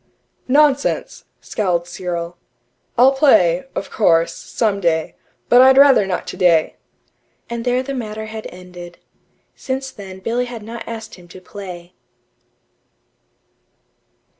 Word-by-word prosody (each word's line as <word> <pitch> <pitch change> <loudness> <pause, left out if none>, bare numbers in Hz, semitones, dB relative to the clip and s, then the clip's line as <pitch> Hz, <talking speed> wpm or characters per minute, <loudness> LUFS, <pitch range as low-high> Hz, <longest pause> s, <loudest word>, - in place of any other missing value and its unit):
"Nonsense!" 285 +1 +1 0.2
scowled 175 -5 -1
Cyril. 175 -1 -5 0.6
"I'll 255 +3 +6
play, 185 - +3
of - - -5
course, 165 -6 +2
some 210 -4 -2
day. 160 -3 0 0.3
But 245 +1 +6
I'd 265 +1 +6
rather 275 -8 +6
not 180 -2 -3
today." 170 -3 +2 0.7
And 235 -1 -3
there 250 +1 +1
the 275 +1 -5
matter 220 -4 -5
had 220 0 -7
ended. 180 -1 -11 0.6
Since 265 0 -4
then 190 -2 -10
Billy 235 +6 -2
had 240 -3 -8
not 230 +2 -8
asked 225 -1 -7
him 180 -2 -14
to 180 - -12
play. 180 -2 -10
210 Hz, 120 wpm, -19 LUFS, 175-245 Hz, 0.7 s, I'll